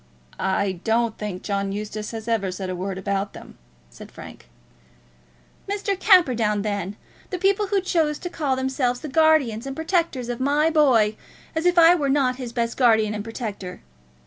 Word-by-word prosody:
"I 190 Hz, -1 st, -1 dB
don't 230 Hz, 0 st, +1 dB
think 200 Hz, -4 st, -5 dB
John 200 Hz, -1 st, -2 dB
Eustace 210 Hz, +1 st, -5 dB
has 225 Hz, -1 st, -7 dB
ever 215 Hz, -5 st, 0 dB
said 185 Hz, 0 st, -5 dB
a -, -, -3 dB
word 190 Hz, +1 st, -4 dB
about 200 Hz, +1 st, -2 dB
them," -, -, -13 dB, 0.3 s
said -, -, -12 dB
Frank. -, -, -12 dB, 1.2 s
"Mr. 405 Hz, 0 st, -1 dB
Camperdown, 240 Hz, -, +4 dB
then; 205 Hz, -2 st, -3 dB, 0.3 s
the 370 Hz, -, -3 dB
people 395 Hz, +3 st, +1 dB
who 400 Hz, 0 st, +1 dB
choose 320 Hz, -5 st, 0 dB
to 355 Hz, -, -6 dB
call 295 Hz, -6 st, -1 dB
themselves 260 Hz, -1 st, -1 dB
the -, -, -5 dB
guardians 280 Hz, -6 st, +2 dB
and 270 Hz, -, -5 dB
protectors 320 Hz, -6 st, -1 dB
of 245 Hz, -1 st, -4 dB
my 290 Hz, +4 st, +2 dB
boy, 240 Hz, -9 st, +3 dB, 0.4 s
as 320 Hz, +2 st, +1 dB
if 355 Hz, 0 st, +2 dB
I 335 Hz, 0 st, +8 dB
were 295 Hz, -6 st, 0 dB
not 265 Hz, -2 st, +2 dB
his 250 Hz, -3 st, -6 dB
best 235 Hz, -1 st, -2 dB
guardian 220 Hz, -4 st, +3 dB
and 210 Hz, -1 st, -4 dB
protector! 210 Hz, -5 st, -6 dB
240 Hz, 170 wpm, -23 LUFS, 210-310 Hz, 1.2 s, I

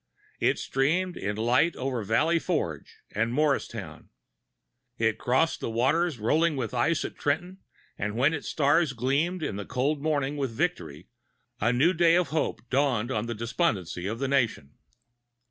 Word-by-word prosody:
It -, -, +2 dB
streamed 175 Hz, +7 st, 0 dB
in 100 Hz, +1 st, -3 dB
light 125 Hz, +9 st, +2 dB
over 130 Hz, -3 st, -2 dB
Valley 155 Hz, -, +2 dB
Forge 85 Hz, -, -3 dB
and 115 Hz, +3 st, 0 dB
Mor[Pg 145 Hz, +2 st, +1 dB
217]ristown. 95 Hz, -10 st, -8 dB, 0.9 s
It 115 Hz, -1 st, +1 dB
crossed 130 Hz, +7 st, +1 dB
the -, -, -3 dB
waters 140 Hz, +7 st, +1 dB
rolling 155 Hz, +9 st, +2 dB
with 125 Hz, -4 st, -3 dB
ice 145 Hz, +6 st, +1 dB
at -, -, -6 dB
Trenton; 180 Hz, +6 st, -2 dB, 0.4 s
and 105 Hz, +1 st, -2 dB
when 135 Hz, +6 st, +3 dB
its -, -, -4 dB
stars 145 Hz, +1 st, +2 dB
gleamed 145 Hz, +9 st, 0 dB
in 100 Hz, -, -3 dB
the 100 Hz, -, -5 dB
cold 140 Hz, +3 st, 0 dB
morning 145 Hz, -2 st, 0 dB
with 135 Hz, -2 st, -1 dB
victory, 90 Hz, -7 st, -3 dB, 0.5 s
a 115 Hz, +3 st, +2 dB
new 140 Hz, +9 st, +3 dB
day 170 Hz, -1 st, +4 dB
of 180 Hz, -1 st, +2 dB
hope 155 Hz, -4 st, -2 dB
dawned 130 Hz, -4 st, +1 dB
on 110 Hz, -1 st, -1 dB
the 115 Hz, -, -3 dB
despondency 100 Hz, -5 st, -1 dB
of 110 Hz, +3 st, -3 dB
the 135 Hz, +2 st, -2 dB
nation. 120 Hz, -, 0 dB
135 Hz, 165 wpm, -27 LUFS, 115-155 Hz, 0.9 s, day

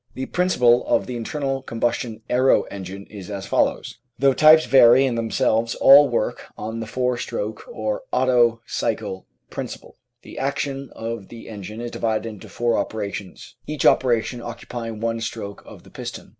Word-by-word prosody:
The 130 Hz, -, -3 dB
principle 125 Hz, -10 st, +3 dB
of -, -, +2 dB
the 125 Hz, -, -5 dB
internal 135 Hz, +3 st, -3 dB
combustion 115 Hz, -2 st, -2 dB
aero 130 Hz, +2 st, +3 dB
engine 100 Hz, 0 st, -7 dB
Applied -, -, -22 dB
Science 100 Hz, -3 st, -8 dB
is -, -, -11 dB
as 100 Hz, -1 st, -5 dB
follows. -, -, 0 dB, 0.2 s
Though 135 Hz, 0 st, +4 dB
types 155 Hz, +3 st, +7 dB
vary 125 Hz, 0 st, +6 dB
in 130 Hz, -, 0 dB
themselves 115 Hz, 0 st, 0 dB
all 140 Hz, +1 st, +7 dB
work 120 Hz, -3 st, -2 dB
on 110 Hz, +2 st, -5 dB
the 110 Hz, -, -5 dB
four 125 Hz, +1 st, -1 dB
stroke -, -, -5 dB
or -, -, -3 dB
Otto 120 Hz, -3 st, +3 dB
cycle 95 Hz, 0 st, -3 dB, 0.2 s
principle. -, -, -7 dB, 0.3 s
The -, -, -9 dB
action 140 Hz, -1 st, -2 dB
of 115 Hz, -3 st, -5 dB
the 115 Hz, -1 st, -11 dB
engine 105 Hz, +1 st, -8 dB
is 120 Hz, 0 st, -5 dB
divided 110 Hz, 0 st, -1 dB
into 105 Hz, -3 st, -9 dB
four 120 Hz, -2 st, 0 dB
operations, 100 Hz, -2 st, -5 dB
each 150 Hz, -1 st, -3 dB
operation 120 Hz, -1 st, +2 dB
occupying 115 Hz, -1 st, -7 dB
one 115 Hz, 0 st, -1 dB
stroke 105 Hz, -3 st, -5 dB
of -, -, -13 dB
the -, -, -17 dB
piston. -, -, -8 dB
120 Hz, 170 wpm, -22 LUFS, 110-130 Hz, 0.3 s, types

